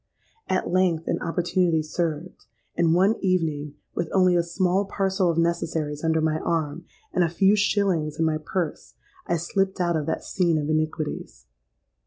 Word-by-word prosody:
At 185 Hz, -, 0 dB
length 175 Hz, -3 st, +1 dB
an -, -, -1 dB
opportunity 170 Hz, -1 st, +1 dB
served; 165 Hz, +1 st, -4 dB, 0.3 s
and 165 Hz, -1 st, +3 dB
one 195 Hz, +5 st, +3 dB
evening, 155 Hz, -6 st, 0 dB, 0.2 s
with 170 Hz, -2 st, -2 dB
only 185 Hz, -2 st, +4 dB
a 175 Hz, -, +4 dB
small 185 Hz, +3 st, 0 dB
parcel 190 Hz, -2 st, 0 dB
of 165 Hz, -, 0 dB
necessaries 165 Hz, -3 st, -1 dB
under 160 Hz, 0 st, +2 dB
my 155 Hz, 0 st, +1 dB
arm, 160 Hz, 0 st, -2 dB, 0.3 s
and 180 Hz, -, +3 dB
a 170 Hz, -, +1 dB
few 195 Hz, +4 st, +3 dB
shillings 195 Hz, -7 st, +1 dB
in 160 Hz, -, +1 dB
my 155 Hz, -1 st, 0 dB
purse, 175 Hz, -1 st, -4 dB, 0.3 s
I 170 Hz, -, +1 dB
slipped 190 Hz, +4 st, -1 dB
out 175 Hz, -1 st, +1 dB
of 155 Hz, -2 st, -2 dB
that -, -, -2 dB
scene 170 Hz, -4 st, +1 dB
of 150 Hz, 0 st, -1 dB
iniquities. 155 Hz, -, -3 dB
170 Hz, 165 wpm, -25 LUFS, 155-185 Hz, 0.3 s, only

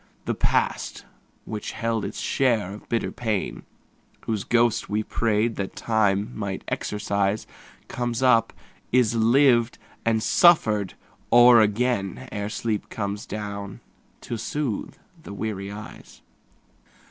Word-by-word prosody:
The -, -, 0 dB
past -, -, -1 dB, 0.4 s
which 105 Hz, -1 st, -5 dB
held 115 Hz, -1 st, -1 dB
its 100 Hz, -, -5 dB
share 115 Hz, -8 st, +1 dB
of 105 Hz, -, -12 dB
bitter 115 Hz, -, -1 dB
pain, 110 Hz, -5 st, -2 dB, 0.6 s
Whose 110 Hz, -3 st, -2 dB
ghost 120 Hz, -1 st, +2 dB
we 105 Hz, +1 st, 0 dB
prayed 110 Hz, +1 st, 0 dB
that 100 Hz, -1 st, -4 dB
Time 105 Hz, -2 st, +1 dB
might 100 Hz, -3 st, -4 dB
exorcise, 100 Hz, 0 st, -1 dB, 0.4 s
Comes 120 Hz, 0 st, -2 dB
up, 115 Hz, -3 st, +4 dB, 0.4 s
is 125 Hz, -3 st, +3 dB
lived 120 Hz, +1 st, +4 dB, 0.3 s
and 110 Hz, -1 st, +1 dB
suffered 110 Hz, -, +4 dB, 0.4 s
o'er 120 Hz, -1 st, +8 dB
again, 110 Hz, +1 st, 0 dB
Ere 105 Hz, 0 st, -3 dB
sleep 110 Hz, -1 st, -3 dB
comes 100 Hz, -1 st, -4 dB
down 100 Hz, -1 st, -6 dB, 0.4 s
to 120 Hz, -, -5 dB
soothe 135 Hz, -2 st, -3 dB, 0.3 s
the 100 Hz, -, -9 dB
weary 100 Hz, -2 st, -4 dB
eyes. 105 Hz, +1 st, -11 dB
110 Hz, 120 wpm, -24 LUFS, 100-120 Hz, 0.6 s, o'er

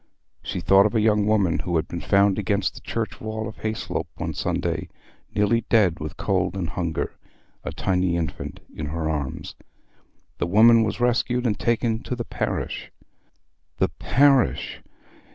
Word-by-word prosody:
She -, -, -4 dB
thought 95 Hz, +1 st, +6 dB
of 110 Hz, -, -6 dB
a -, -, +4 dB
young 105 Hz, -1 st, +3 dB
woman 100 Hz, -6 st, +2 dB
who 90 Hz, -1 st, -2 dB
had 80 Hz, -, +1 dB
been 85 Hz, -, -5 dB
found 100 Hz, 0 st, +3 dB
against 100 Hz, -1 st, 0 dB
the -, -, -11 dB
church 115 Hz, -1 st, -4 dB
wall 110 Hz, 0 st, -4 dB
at 110 Hz, -, -10 dB
Hayslope 110 Hz, 0 st, -2 dB
one -, -, -3 dB
Sunday, -, -, -2 dB, 0.5 s
nearly 105 Hz, +3 st, +3 dB
dead 95 Hz, -7 st, +3 dB
with 75 Hz, 0 st, -6 dB
cold -, -, 0 dB
and 90 Hz, -4 st, -2 dB
hunger—a 85 Hz, -3 st, -6 dB
tiny 90 Hz, -2 st, 0 dB
infant 85 Hz, -2 st, -4 dB
in 75 Hz, -, -5 dB
her 80 Hz, +2 st, -2 dB
arms. 75 Hz, -4 st, -3 dB, 0.9 s
The -, -, 0 dB
woman 115 Hz, +5 st, +6 dB
was 110 Hz, -2 st, -1 dB
rescued 125 Hz, +1 st, +1 dB
and 105 Hz, -4 st, 0 dB
taken 115 Hz, -1 st, +1 dB
to 125 Hz, -, -4 dB
the 120 Hz, -1 st, -4 dB
parish. -, -, -3 dB, 0.9 s
"The -, -, +2 dB
parish!" 135 Hz, -1 st, +2 dB
105 Hz, 155 wpm, -24 LUFS, 90-115 Hz, 0.9 s, thought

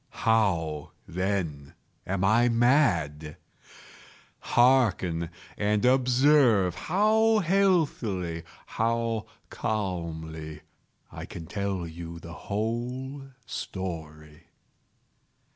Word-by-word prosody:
How, 85 Hz, -9 st, +1 dB
then, 85 Hz, -6 st, -3 dB, 0.3 s
am 95 Hz, 0 st, -1 dB
I 115 Hz, +5 st, +4 dB
mad? 105 Hz, -, +2 dB, 1.0 s
Hearken! 95 Hz, -10 st, +2 dB, 0.3 s
and 105 Hz, +2 st, +1 dB
observe 125 Hz, -, +4 dB
how 215 Hz, -, +2 dB
healthily—how 115 Hz, -, 0 dB, 0.2 s
calmly 80 Hz, -7 st, -4 dB, 0.5 s
I -, -, -7 dB
can 80 Hz, -, -8 dB
tell 100 Hz, 0 st, -3 dB
you 85 Hz, 0 st, -8 dB
the 85 Hz, 0 st, -10 dB
whole 125 Hz, +8 st, -4 dB, 0.2 s
story. 75 Hz, -5 st, -7 dB
100 Hz, 70 wpm, -27 LUFS, 85-125 Hz, 1.0 s, I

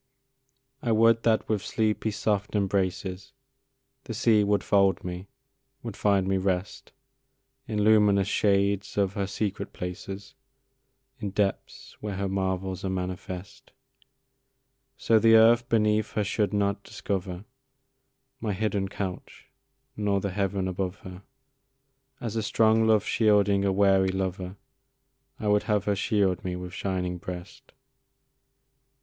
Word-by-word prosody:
I 120 Hz, -, -1 dB
would 115 Hz, +1 st, +4 dB
that 110 Hz, -2 st, +1 dB
with 105 Hz, -3 st, 0 dB
sleepy, 110 Hz, +1 st, 0 dB
soft 105 Hz, -1 st, -1 dB
embraces 95 Hz, -1 st, -1 dB, 0.7 s
The 115 Hz, -, -5 dB
sea 110 Hz, -1 st, +4 dB
would 100 Hz, -2 st, +1 dB
fold 100 Hz, -1 st, +2 dB
me 90 Hz, +2 st, -6 dB, 0.6 s
would 115 Hz, -4 st, -6 dB
find 100 Hz, -2 st, +2 dB
me 95 Hz, 0 st, +1 dB
rest, 95 Hz, +1 st, -2 dB, 0.8 s
In 105 Hz, -3 st, -1 dB
luminous 105 Hz, -2 st, +4 dB
shades 100 Hz, -1 st, +1 dB
of 100 Hz, -1 st, +1 dB
her 100 Hz, -2 st, -2 dB
secret 105 Hz, +1 st, -3 dB
places, 95 Hz, +3 st, -7 dB, 0.9 s
In 105 Hz, -3 st, -3 dB
depths 100 Hz, 0 st, -3 dB
where 105 Hz, -2 st, -4 dB
her 100 Hz, +1 st, -2 dB
marvels 95 Hz, -1 st, -2 dB
are 95 Hz, -, -1 dB
manifest; 95 Hz, +6 st, -6 dB, 1.2 s
So 115 Hz, -1 st, +3 dB
the 115 Hz, 0 st, +6 dB
earth 115 Hz, +2 st, +5 dB
beneath 105 Hz, -1 st, +1 dB
her 105 Hz, -, 0 dB
should 105 Hz, +1 st, 0 dB
not 100 Hz, -1 st, 0 dB
discover 95 Hz, -3 st, -4 dB, 0.9 s
My 110 Hz, -4 st, -2 dB
hidden 100 Hz, -1 st, -1 dB
couch 95 Hz, -2 st, -7 dB, 0.4 s
nor 105 Hz, -2 st, 0 dB
the 100 Hz, 0 st, -3 dB
heaven 95 Hz, -1 st, -1 dB
above 95 Hz, 0 st, -3 dB
her 90 Hz, 0 st, -10 dB, 1.0 s
As 115 Hz, -2 st, -5 dB
a 110 Hz, -, 0 dB
strong 110 Hz, +1 st, +3 dB
love 110 Hz, -2 st, +3 dB
shielding 105 Hz, -3 st, +3 dB
a 100 Hz, -, +2 dB
weary 95 Hz, -1 st, +3 dB
lover, 95 Hz, 0 st, -3 dB, 0.8 s
I 105 Hz, -, -3 dB
would 105 Hz, 0 st, +3 dB
have 105 Hz, -1 st, +1 dB
her 105 Hz, -, +1 dB
shield 100 Hz, -2 st, +1 dB
me 90 Hz, -1 st, -3 dB
with 90 Hz, 0 st, -7 dB
shining 90 Hz, -2 st, -3 dB
breast. 90 Hz, +1 st, -9 dB
100 Hz, 130 wpm, -27 LUFS, 95-105 Hz, 1.2 s, the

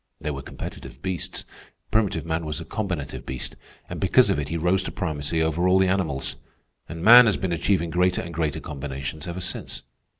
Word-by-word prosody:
They 75 Hz, -, -3 dB
were 70 Hz, -1 st, -5 dB
competitive -, -, -8 dB
beasts. 95 Hz, -5 st, -4 dB, 0.5 s
Primitive 110 Hz, -6 st, +1 dB
man 80 Hz, 0 st, -1 dB
was 75 Hz, +1 st, -4 dB
a 85 Hz, -, -7 dB
combinative 95 Hz, -7 st, -4 dB
beast, 65 Hz, -1 st, -6 dB, 0.3 s
and -, -, -6 dB
because -, -, +5 dB
of -, -, +1 dB
it 75 Hz, 0 st, -3 dB
he 85 Hz, -, -1 dB
rose 90 Hz, +4 st, +2 dB
to 95 Hz, -, -5 dB
primacy 80 Hz, -3 st, -1 dB
over 80 Hz, +3 st, +1 dB
all 90 Hz, +1 st, +5 dB
the 95 Hz, 0 st, +4 dB
animals. 85 Hz, -8 st, -1 dB, 0.5 s
And 85 Hz, 0 st, -6 dB
man 120 Hz, +3 st, +10 dB
has 105 Hz, -, +2 dB
been 95 Hz, -, -2 dB
achieving 85 Hz, 0 st, +1 dB
greater 90 Hz, +1 st, +2 dB
and 85 Hz, -, -7 dB
greater 80 Hz, -3 st, -1 dB
combinations 70 Hz, +2 st, -5 dB
ever 90 Hz, +1 st, -4 dB
since. -, -, -4 dB
85 Hz, 195 wpm, -25 LUFS, 75-95 Hz, 0.5 s, man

